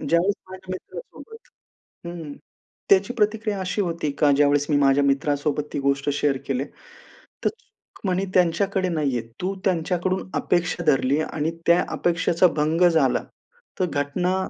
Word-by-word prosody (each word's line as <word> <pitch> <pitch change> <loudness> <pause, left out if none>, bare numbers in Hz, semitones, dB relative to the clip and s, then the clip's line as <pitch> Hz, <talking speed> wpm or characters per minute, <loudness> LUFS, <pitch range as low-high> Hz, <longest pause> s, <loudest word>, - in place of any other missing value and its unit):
ज्यावेळेस 175 +4 +2 0.2
माझ्या 185 0 -10
मित्रासोबत 450 - -10 0.6
हं, 165 -4 -7 0.6
त्याची 195 +4 +4
प्रतिक्रिया 210 -2 0
अशी 185 +2 -2
होती 165 -4 -2
का 150 -2 +4
ज्यावेळेस 145 0 +3
मी 145 - +3
माझ्या 140 0 +4
मित्रासोबत 145 +1 0
ती - - -2
गोष्ट 140 +1 0
शेअर 145 -1 +1
केली, 135 0 -1 0.8
तर - - +4
सुख 445 - -16
म्हणे 190 0 0
त्यांच्याकडे 185 +2 +2
नाहीये. 145 -8 -1 0.2
तू 190 +2 -1
त्यांच्याकडून 185 +1 0
अपेक्षा 175 0 0
धरली 140 0 +2
आणि 155 +1 -2 0.2
त्या 170 +1 +5
अपेक्षेचा 170 +1 +2
भंग 160 +4 +3
झाला, 165 -2 +2 0.6
तर 185 - +3
घटना 160 +6 0
170 Hz, 135 wpm, -23 LUFS, 145-185 Hz, 0.8 s, त्या